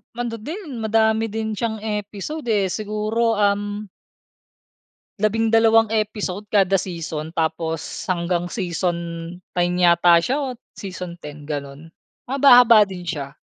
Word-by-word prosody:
Ano 235 -2 -4
din, 300 - -7
madami 220 0 +2
din 220 0 -3
siyang 220 0 -3
episode 210 +7 -4
eh. 200 -4 +1
Siguro 215 +2 -1
um 205 0 0 1.4
12 225 +1 +3
episode 210 -2 -2
kada 195 -1 +4
season 165 -3 -5
tapos 160 0 -1 0.2
hanggang 175 -1 -1
season 175 -3 -1 0.6
9 175 0 +1
yata 170 -1 +5
siya 265 +10 0
o 280 -2 -2 0.3
season 180 -3 -7
10, 150 -2 -10
ganun. 145 +2 -6 0.4
Mahaba-haba 245 -5 +7
din 185 -2 -8
siya. 145 -6 -5
205 Hz, 115 wpm, -22 LUFS, 175-225 Hz, 1.4 s, Mahaba-haba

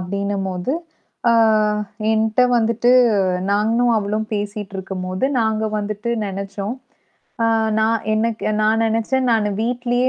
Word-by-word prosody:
அப்டின்னம்போது 195 +2 -3 0.6
ஆ - - +4 0.8
என்ட்ட 220 +2 +2
வந்துட்டு 230 +1 +2 0.6
நானும் 225 +4 +2
அவளும் 210 +1 -2
பேசிட்டு 205 -1 -4
இருக்கும்போது, 185 +1 -4 0.2
நாங்க 220 -1 0
வந்துட்டு 210 +2 -3
நெனச்சோம். 200 +3 -5 0.7
அ - - +3 0.3
நான் 220 0 +1
எனக்கு 225 +1 -1 0.2
நான் 220 +1 +2
நெனச்சேன், 230 +4 0
"நானு 215 -2 +1
வீட்லயே 245 +1 0
215 Hz, 105 wpm, -20 LUFS, 200-230 Hz, 0.8 s, ஆ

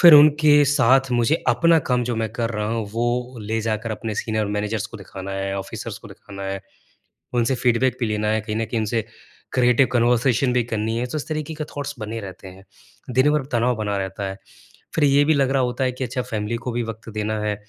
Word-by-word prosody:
फिर 170 -3 +10
उनके 150 0 +7
साथ 135 -1 +3
मुझे 120 +6 +2
अपना 165 -1 +5
काम 125 -1 +2
जो 120 -1 -2
मैं 110 -1 -1
कर 115 -2 -2
रहा 105 -2 -2
हूँ, 115 -2 -2
वो 120 +2 -1
ले 110 +2 -2
जाकर 110 +1 -2
अपने 110 0 -4
सीनियर 110 -1 -1
मैनेजर्स 105 +1 -2
को - - -10
दिखाना 95 0 -8
है, 95 0 -2
ऑफिसर्स 95 - -6
को - - -13
दिखाना 100 -1 -10
है, 95 0 -3 0.7
उनसे 120 +2 +2
फ़ीडबैक 125 +1 +2
भी 120 - +1
लेना 105 0 -1
है, 110 0 +2
कहीं 110 0 -4
न 115 - 0
कहीं 115 0 -2
उनसे 110 +1 -1 0.5
क्रिएटिव 125 +1 +4
कन्वर्सेशन 125 +1 +3
भी 125 -1 +3
करनी 110 0 -2
है। 125 - -1
तो 155 +5 -3
इस - - -6
तरीके 155 0 -3
के 155 0 -4
थॉट्स 145 -1 -6
बने 110 +1 -4
रहते 95 -1 -9
हैं, 95 +1 -14 0.5
दिन 130 +4 +4
भर 150 -3 +1
तनाव 120 +1 +2
बना 105 -2 -2
रहता 95 +1 -4
है। 95 +1 -7 0.6
फिर 160 - +2
ये 145 0 +5
भी 155 - +4
लग 135 -2 +2
रहा 135 -1 +2
होता 125 +1 -1
है 130 - +1
कि 130 +1 -5
अच्छा 125 +1 -2
फैमिली 110 -2 -3
को 125 - -1
भी 120 0 -1
वक़्त 115 0 -7
देना 110 0 -2
है 105 -1 -1
115 Hz, 225 wpm, -22 LUFS, 105-130 Hz, 0.7 s, फिर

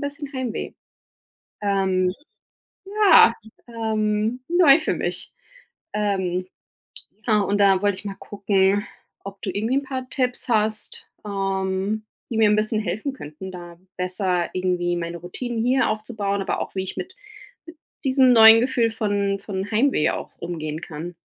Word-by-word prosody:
bisschen 285 0 -5
Heimweh. 255 -4 -4 0.9
Ähm, 190 -2 +1 0.8
ja 400 - +6 0.3
ähm, 220 +1 -1
neu 335 -4 +6
für - - -1
mich. - - -4 0.6
Ähm, 190 -3 -1 0.8
ja 215 -2 +4
und 200 +1 0
da 195 -1 +4
wollte 205 -2 +1
ich - - -13
mal 195 -1 -5
gucken, 200 0 +1 0.4
ob 200 0 -9
du 195 - -3
irgendwie 220 +5 -1
'n 280 - -1
paar 260 -2 -5
Tipps 250 -1 -1
hast, 215 -1 0 0.2
ähm, 195 +1 -2 0.3
die 225 - -1
mir 215 -2 +5
'n 210 - +4
bisschen 215 0 0
helfen 215 +9 -3
könnten, 185 - -9
da 175 -1 -10 0.2
besser 180 -1 -1
irgendwie 180 -1 0
meine 170 0 -4
Routinen 225 +7 -5
hier 255 0 +2
aufzubauen, 215 -2 -2
aber - - -2
auch - - -6
wie 190 - -1
ich 190 - -7
mit 375 +1 -6 0.9
diesem 260 -1 +5
neuen 225 0 +9
Gefühl 240 -3 +1
von 200 -2 -1
von 195 0 -5
Heimweh 230 - +2
auch - - -6
umgehen 155 -3 -5
kann. 165 +2 -7
205 Hz, 145 wpm, -23 LUFS, 190-235 Hz, 0.9 s, neuen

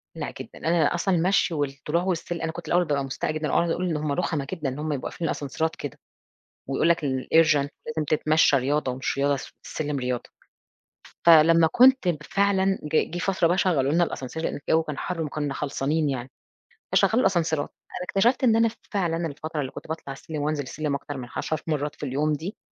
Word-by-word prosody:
لأ - - -5
جدًا، - - -9
أنا 165 -1 +2
أصلًا 180 +2 +1
المشي 180 +1 +2
والطلوع 145 +3 -1
والسل 175 -2 -2
أنا 165 0 -1
كنت 160 0 -9
الأوّل 175 +3 +3
بابقى 145 -3 0
مستاءة 135 +3 -3
جدًا 155 0 -2
وأقعد 170 - +2
أقول 180 +2 -1
إن 160 - 0
هُم 150 -1 -2
رخمة 145 -3 -1
جدًا 160 -7 -2
إن 130 +3 -6
هُم 155 0 -2
يبقى 135 - -3
قافلين 165 - -3
الأسانسيرات 160 +3 -2
كده. 145 -5 -7 0.7
ويقول 135 +4 +1
لك 170 0 +3
الurgent 145 +2 +3 0.2
لازم 155 0 -2
تتمشى 155 -1 +4
رياضة 135 0 0
ومش 130 +2 -3
رياضة 140 +1 +3
الس 135 - -7
السلم 150 -2 -3
رياضة. 125 -1 -3 1.0
فلمّا 165 0 +7
كنت 235 - +4
فعلًا 195 +1 +1
جه 150 +1 +2
جه 175 - -3
فترة 185 -2 +2
بقى 175 +2 +1
شغلوا 145 -8 +2
لنا 175 +1 +4
الascenseur 130 +4 -8
لأن - - -2
الجو 160 0 +4
كان 150 -3 -6
حر 175 -2 -3
وكنّا 145 -2 -2
خلصانين 145 +2 -1
يعني. 130 -1 -4 0.6
فشغلوا 230 +3 +4
الأسانسيرات. 165 - +1 0.2
أنا 180 - -5
اكتشفت 240 +7 +2
إن 230 -3 +5
أنا 230 0 +4 0.2
فعلًا 170 -4 0
الفترة 155 +1 -4
اللي 130 - -4
كنت - - -10
باطلع 160 -3 -5
السلم 150 +2 -6
وأنزل 150 0 -1
السلم 145 +2 -3
أكتر 140 0 -6
من 125 -2 -6
10 155 -1 -2
مرّات 150 -2 -1
في - - -6
اليوم 145 +3 0
دي، 165 +8 -5
155 Hz, 195 wpm, -25 LUFS, 145-170 Hz, 1.0 s, فلمّا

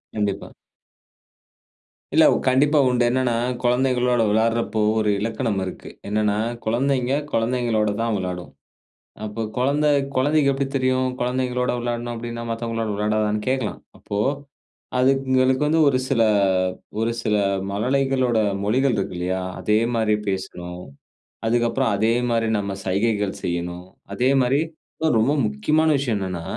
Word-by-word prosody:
கண்டிப்பா. 100 -2 -2 1.6
இல்ல - - +6 0.2
கண்டிப்பா 145 +4 +4
உண்டு. 125 -1 +2
என்னென்னா, 125 -2 +1 0.3
குழந்தைகளோட 125 -1 +2
விளையாடுறப்போ, 110 +1 +1 0.2
ஒரு 105 -1 +1
இலக்கணம் 110 -2 -1
இருக்கு. 95 - -8 0.2
என்னன்னா, 105 0 +1 0.3
குழந்தைங்க 130 +3 +1 0.2
குழந்தைங்களோட 115 -2 +1
தான் 115 -1 0
விளையாடும். 90 -2 -5 0.7
அப்ப 110 +2 -4
குழந்த 140 +4 +1 0.3
குழந்தைக்கு 145 +2 +3
எப்டி 135 0 -1
தெரியும்? 130 -1 +1
குழந்தைங்களோட 125 0 0
விளையாடணும் 120 0 -3
அப்டின்னா 115 0 -6
மத்தவங்களோட 115 -1 -3
விளையாடாதான்னு 105 0 0
கேட்கலாம். 130 -4 -1 0.2
அப்போ 100 - -5 0.8
அதுங்களுக்கு 130 0 +2
வந்து 160 +2 +2
ஒரு 130 -2 +2
சில 120 -4 +2 0.8
ஒரு 115 +1 0
சில 105 -1 +1 0.3
மழலைகளோட 130 +2 +1 0.3
மொழிகள் 130 +5 +2
இருக்கு 100 - -3
இல்லயா! 90 +1 -1 0.2
அதே 105 0 +2 0.2
மாரி 110 -2 +2
பேசணும். 90 -2 -5 0.6
அதுக்கு 120 +1 +2
அப்பறம் 130 -3 0
அதேமாரி 115 +1 +1
நம்ம 100 -1 -3
சைகைகள் 100 +1 0
செய்ணும். 85 +1 -3 0.3
அதேமாரி 130 +4 +2 0.5
ஒ - - +4
ரொம்ப 125 +7 +2
முக்கியமான 150 +10 +1
விஷயம் 125 -6 -1
என்னன்னா, 90 -3 -4
115 Hz, 115 wpm, -22 LUFS, 105-130 Hz, 1.6 s, இல்ல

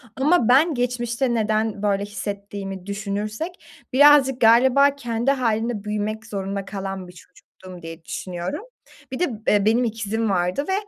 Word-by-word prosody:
ama 280 -2 +2
ben 300 +6 +5
geçmişte 245 0 -1
neden 215 -2 0
böyle 200 -1 +1
hissettiğimi 200 -2 -6
düşünürsek 210 - -4 0.3
birazcık 270 -2 +6
galiba 260 +5 +5
kendi 240 -1 -1
hâlinde 230 -4 -1
büyümek 215 +1 -3
zorunda 195 -2 -4
kalan 195 -2 -5
bir 180 - -13
çocuktum 180 0 -15
diye 165 0 -10
düşünüyorum. 180 - -5 0.5
Bir 260 - -4
de, 360 - +3 0.2
eee, 205 -1 +3
benim 230 +3 +3
ikizim 225 -1 -2
vardı 180 +7 0
ve, - - +1
215 Hz, 140 wpm, -22 LUFS, 200-245 Hz, 0.5 s, birazcık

